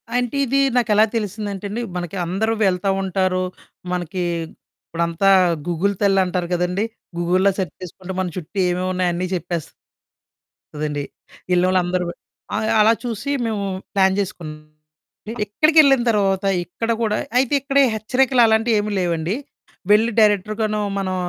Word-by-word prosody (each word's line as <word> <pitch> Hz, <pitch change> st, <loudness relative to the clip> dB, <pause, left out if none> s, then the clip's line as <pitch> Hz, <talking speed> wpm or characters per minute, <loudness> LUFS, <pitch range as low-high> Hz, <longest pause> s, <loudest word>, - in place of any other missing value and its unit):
అంటే 245 Hz, +1 st, -1 dB
ఇది 275 Hz, +3 st, +1 dB, 0.2 s
నాకెలా 215 Hz, -3 st, +4 dB
తెలిసిందంటేండి, 205 Hz, 0 st, -3 dB
మనకి 175 Hz, +2 st, -4 dB
అందరూ 210 Hz, +6 st, 0 dB
వెళ్తా 190 Hz, +1 st, +1 dB
ఉంటారు. 185 Hz, -1 st, 0 dB, 0.5 s
మనకి 180 Hz, 0 st, -3 dB, 0.7 s
ఇప్పుడంతా 170 Hz, +3 st, 0 dB, 0.4 s
గూగుల్ 175 Hz, +4 st, 0 dB
తల్లంటారు 185 Hz, -3 st, +2 dB
కదండీ! 180 Hz, +3 st, 0 dB, 0.3 s
గూగుల్‌లో 185 Hz, +3 st, +2 dB
సెర్చ్ 185 Hz, -6 st, -3 dB
చేసుకుంటే 185 Hz, +1 st, -8 dB
మన 185 Hz, -, 0 dB
చుట్టూ 180 Hz, +3 st, -8 dB
ఏమేమున్నాయో 180 Hz, 0 st, 0 dB
అన్నీ 180 Hz, +2 st, -2 dB
చెప్పేస్తదండి. 170 Hz, -2 st, -6 dB, 1.6 s
యెళ్లినోళ్లందరూ 180 Hz, 0 st, +2 dB, 0.5 s
ఆ! -, -, 0 dB, 0.2 s
అలా 215 Hz, +2 st, +6 dB
చూసి 240 Hz, +3 st, -3 dB
మేము 220 Hz, -3 st, -2 dB, 0.3 s
ప్లాన్ 190 Hz, -1 st, +3 dB
జేసుకున్నామండి. 155 Hz, -5 st, -6 dB, 0.7 s
ఇక్కడికెళ్లిన 280 Hz, +4 st, +4 dB
తర్వాత 195 Hz, -3 st, +1 dB, 0.2 s
ఇక్కడ 225 Hz, +7 st, -3 dB
కూడా 215 Hz, -1 st, +1 dB, 0.2 s
అయితే 260 Hz, +1 st, +2 dB
ఇక్కడే 275 Hz, +1 st, +3 dB
హెచ్చరికలు 250 Hz, +3 st, +2 dB
అలాంటియేమి 220 Hz, -1 st, +2 dB
లేవండి. 170 Hz, +1 st, -1 dB, 0.6 s
వెళ్లి 220 Hz, +3 st, +4 dB
డైరెక్ట్‌రుగను 215 Hz, +1 st, +2 dB, 0.2 s
మనం 185 Hz, -1 st, -2 dB
195 Hz, 115 wpm, -21 LUFS, 180-220 Hz, 1.6 s, అలా